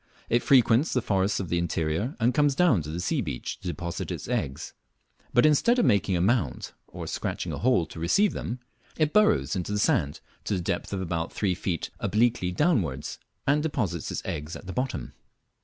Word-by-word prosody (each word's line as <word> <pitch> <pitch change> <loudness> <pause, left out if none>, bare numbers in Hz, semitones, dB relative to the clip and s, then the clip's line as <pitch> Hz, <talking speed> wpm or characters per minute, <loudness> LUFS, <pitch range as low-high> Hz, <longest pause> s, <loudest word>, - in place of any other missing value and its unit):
It 120 +1 +3
frequents 130 +2 +4
the 125 - +2
forests 100 0 +1
of 95 -4 -4
the 85 - +1
interior, 85 - -1
and 120 +2 +2
comes 145 0 +3
down 145 - +4
to 75 - -7
the 80 +3 -4
sea 135 - 0
beach 70 - -5
to 95 - -8
deposit 85 -1 -4
its - - -5
eggs, 70 +4 -3 0.6
but 120 - +4
instead 195 - +4
of 245 - +3
making 100 -4 +2
a - - 0
mound, 100 - 0 0.2
or - - -7
scratching - - -3
a - - -4
hole 125 -8 +3
to 80 - -10
receive 190 - +3
them, 120 +2 -4 0.4
it 155 -1 +1
burrows 150 - +3
into 95 +1 -3
the 105 - 0
sand 75 -8 +1 0.3
to 105 - 0
the - - -1
depth 85 0 -3
of 100 -2 -2
about 85 -2 -2
three 100 -3 0
feet 90 -2 -3
obliquely 110 -4 +1
downwards, 90 - 0 0.3
and 145 +2 +3
deposits 110 - -2
its - - -4
eggs 75 0 -4
at - - -10
the 95 - -6
bottom. 125 - -3
100 Hz, 200 wpm, -27 LUFS, 85-130 Hz, 0.6 s, frequents